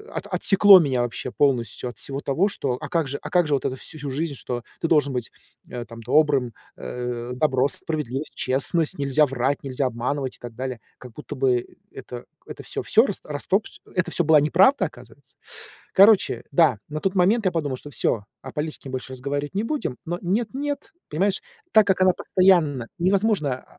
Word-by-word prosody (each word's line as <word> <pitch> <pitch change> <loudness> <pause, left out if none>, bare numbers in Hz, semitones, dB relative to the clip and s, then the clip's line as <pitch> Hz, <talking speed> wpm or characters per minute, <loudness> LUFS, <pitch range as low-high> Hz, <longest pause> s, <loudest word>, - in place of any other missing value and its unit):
от - - -4
отсекло 195 -1 +6
меня 135 -7 +1
вообще 120 +1 -4
полностью 125 -4 0
от 120 - -11
всего 140 0 -5
того, 155 +9 +1
что 140 -9 -2
А - - -6
как 165 -4 0
же 140 +1 -4
а - - -7
как 175 -1 +3
же 150 - 0
вот 135 - -3
это 130 - -1
вс - - -13
всю 150 -3 -7
жизнь, 150 +3 -2
что 120 -2 -5 0.2
ты 165 - +1
должен 145 -4 +3
быть, 125 -4 -4 0.4
э, 120 -1 -6
там, 115 0 -11
добрым, 135 -1 +2 0.2
э, 120 - -5
добро, 130 -1 +2
справедливость, 150 -3 -4
честность, 140 +5 0
нельзя 140 +2 +3
врать, 135 +1 -1
нельзя 135 0 -2
обманывать 130 +3 -3
и - - -42
так 120 -2 -9
далее?". 130 0 -4 0.2
Как 125 - -11
будто 150 - -8
бы, 125 -3 +1 0.2
это 120 -1 -9 0.2
это - - -8
всё, - - -5
всё - - +4
рас - - -4
растоп 185 +8 -1 0.3
Это 180 -1 0
всё 175 - +1
была 155 -1 +6
неправда, 185 - +4
оказывается. - - -13 0.6
Короче, 200 +1 +5
да, 155 - +4
на 155 0 -4
тот 195 +2 -1
момент 205 +5 +3
я 185 - +2
подумал, 145 -5 -2
что 145 - -11
всё, 115 -6 -1 0.2
о 130 - -8
политике 150 -2 -5
больше 130 0 -5
разговаривать 140 +4 -4
не 200 - 0
будем. 250 - -3
Но 175 +2 -3
нет, 205 +6 0
нет, 285 +1 -4 0.2
понимаешь, 190 +6 0 0.3
так 215 -2 +6
как 190 -1 +2
она 185 0 +6
постоянно 170 -12 +2
невозможно, 185 - +1
145 Hz, 190 wpm, -24 LUFS, 130-175 Hz, 0.6 s, отсекло